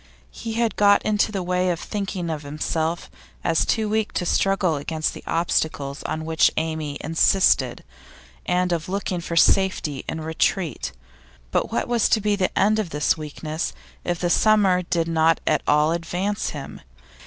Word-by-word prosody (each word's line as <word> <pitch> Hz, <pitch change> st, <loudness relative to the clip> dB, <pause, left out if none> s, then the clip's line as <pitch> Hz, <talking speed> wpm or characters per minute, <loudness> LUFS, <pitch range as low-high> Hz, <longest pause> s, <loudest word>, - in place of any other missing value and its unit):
He 225 Hz, -1 st, -6 dB
had 230 Hz, 0 st, 0 dB
got 205 Hz, -1 st, +5 dB
into 215 Hz, 0 st, +1 dB
the 195 Hz, -3 st, -3 dB
way 180 Hz, +1 st, 0 dB
of 170 Hz, -2 st, -1 dB
thinking 195 Hz, -4 st, -4 dB
of 155 Hz, -2 st, -4 dB
himself 160 Hz, +3 st, -2 dB, 0.4 s
as 165 Hz, -2 st, +1 dB
too 220 Hz, -2 st, +1 dB
weak 215 Hz, 0 st, -1 dB
to 180 Hz, -, -1 dB
struggle 190 Hz, -2 st, +2 dB
against 155 Hz, +2 st, -2 dB
the -, -, -10 dB
obstacles 155 Hz, -4 st, -1 dB
on 155 Hz, 0 st, -3 dB
which 160 Hz, -1 st, +4 dB
Amy 155 Hz, -2 st, -2 dB
insisted, 160 Hz, -5 st, +2 dB, 0.6 s
and 180 Hz, 0 st, +1 dB
of 170 Hz, +1 st, -2 dB
looking 190 Hz, -2 st, -2 dB
for 170 Hz, -, -4 dB
safety 165 Hz, -5 st, +2 dB
in 160 Hz, -, -3 dB
retreat; 160 Hz, +2 st, -1 dB, 0.6 s
but -, -, 0 dB
what -, -, -1 dB
was 240 Hz, -3 st, +2 dB
to 220 Hz, -, +3 dB
be 210 Hz, 0 st, +1 dB
the 190 Hz, -2 st, -1 dB
end 215 Hz, +2 st, +3 dB
of 205 Hz, -5 st, -2 dB
this 150 Hz, -1 st, +1 dB
weakness 155 Hz, +1 st, -4 dB, 0.3 s
if 175 Hz, -1 st, -1 dB
the 175 Hz, -1 st, 0 dB
summer 200 Hz, -4 st, +4 dB
did 170 Hz, -2 st, -1 dB
not 165 Hz, 0 st, +3 dB
at -, -, +2 dB
all 150 Hz, +2 st, +4 dB
advance 180 Hz, +5 st, -2 dB
him? 145 Hz, -3 st, -8 dB
175 Hz, 165 wpm, -23 LUFS, 160-195 Hz, 0.6 s, got